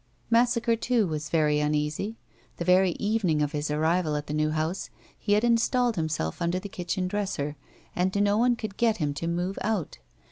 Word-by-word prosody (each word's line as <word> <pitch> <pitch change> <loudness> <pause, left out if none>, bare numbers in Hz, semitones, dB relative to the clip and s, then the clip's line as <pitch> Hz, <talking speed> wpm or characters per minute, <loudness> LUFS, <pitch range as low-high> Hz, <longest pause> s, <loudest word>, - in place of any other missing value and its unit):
Massacre, 235 0 +3
too, 230 -1 +1
was 155 -2 -4
very 150 -2 +2
uneasy. 150 +8 -1 0.4
The 170 - -3
very 180 0 +4
evening 200 -8 +1
of 145 - -1
his 150 0 -2
arrival 160 +1 +1
at 145 0 -3
the 150 - -5
new 155 0 +1
house 155 +4 -2 0.3
he 205 - 0
had 210 +2 +3
installed 240 0 +2
himself 155 - -2
under 170 +1 +1
the 195 +2 -5
kitchen 180 0 -2
dresser 180 -7 -2 0.4
and 185 +2 0
no 205 0 +3
one 240 +2 +3
could 215 -4 -6
get 225 -2 +2
him 150 -4 -1
to 165 +4 -4
move 175 +3 -2
out. 210 - -2
180 Hz, 185 wpm, -27 LUFS, 155-215 Hz, 0.4 s, very